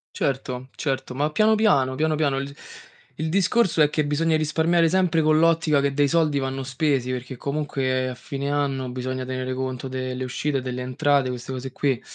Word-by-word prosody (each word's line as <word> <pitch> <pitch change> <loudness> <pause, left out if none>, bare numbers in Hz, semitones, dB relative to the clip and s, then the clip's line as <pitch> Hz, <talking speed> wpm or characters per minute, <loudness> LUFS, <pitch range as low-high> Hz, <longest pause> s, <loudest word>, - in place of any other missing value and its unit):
Certo, 130 -1 -2
certo, 135 -3 -3
ma 145 +3 0
piano 215 +5 +4
piano, 140 -12 +3
piano 155 +1 +1
piano. 145 -3 +1
Il 140 +1 -6 0.6
il 160 - -1
discorso 190 0 +2
è 150 - +5
che 150 0 0
bisogna 155 +2 +1
risparmiare 160 +2 +2
sempre 175 -1 +2
con 155 0 +4
l'ottica 160 -3 +3
che 140 0 0
dei 145 0 +3
soldi 155 -2 +2
vanno 135 0 -3
spesi, 135 -1 0
perché 125 +1 -5
comunque 135 -2 -1
a 125 - -4
fine 140 +2 -5
anno 140 -3 -1
bisogna 130 0 -4
tenere 130 0 -3
conto 130 0 -4
delle 130 0 -3
uscite, 135 +2 -2
delle 125 0 -4
entrate, 140 +1 +1
queste 125 +1 -5
cose 130 0 -5
qui. 135 -4 0
140 Hz, 185 wpm, -24 LUFS, 130-155 Hz, 0.6 s, è